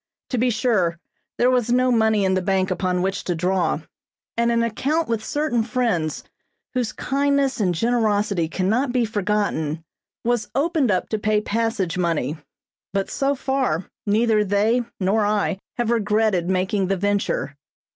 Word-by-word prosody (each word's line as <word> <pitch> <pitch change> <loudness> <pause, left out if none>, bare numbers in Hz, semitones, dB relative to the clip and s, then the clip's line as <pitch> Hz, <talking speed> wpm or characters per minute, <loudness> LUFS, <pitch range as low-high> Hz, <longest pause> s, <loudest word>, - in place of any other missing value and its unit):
To 250 - 0
be 250 +2 +3
sure, 210 -8 +1 0.4
there 245 +1 +4
was 245 -2 +1
no 255 +1 +3
money 220 -3 +3
in 190 - +2
the 185 - +1
bank 190 0 +1
upon 180 0 0
which 195 +1 -1
to 175 - -1
draw, 180 +2 0 0.5
and 235 0 +2
an 235 0 +2
account 290 +8 0
with 230 -2 -1
certain 290 -5 0
friends 225 - -1 0.5
whose 250 -4 -1
kindness 280 -1 0
and 180 -4 +1
generosity 210 -4 +1
cannot 220 +10 0
be 245 -2 +2
forgotten, 205 -7 -1 0.4
was 235 -3 0
opened 300 -2 +1
up 185 -3 +1
to 220 - -1
pay 210 0 +2
passage 210 -5 -1
money; 165 -4 0 0.6
but 195 -1 -1
so 275 +1 +1
far 260 - -1 0.2
neither 215 +1 +3
they 210 +5 +2 0.2
nor 205 +3 +2
I 205 -2 0 0.2
have 240 -1 0
regretted 210 -5 +1
making 190 +1 +1
the 195 +1 0
venture. 200 -7 -1
215 Hz, 155 wpm, -22 LUFS, 190-240 Hz, 0.6 s, there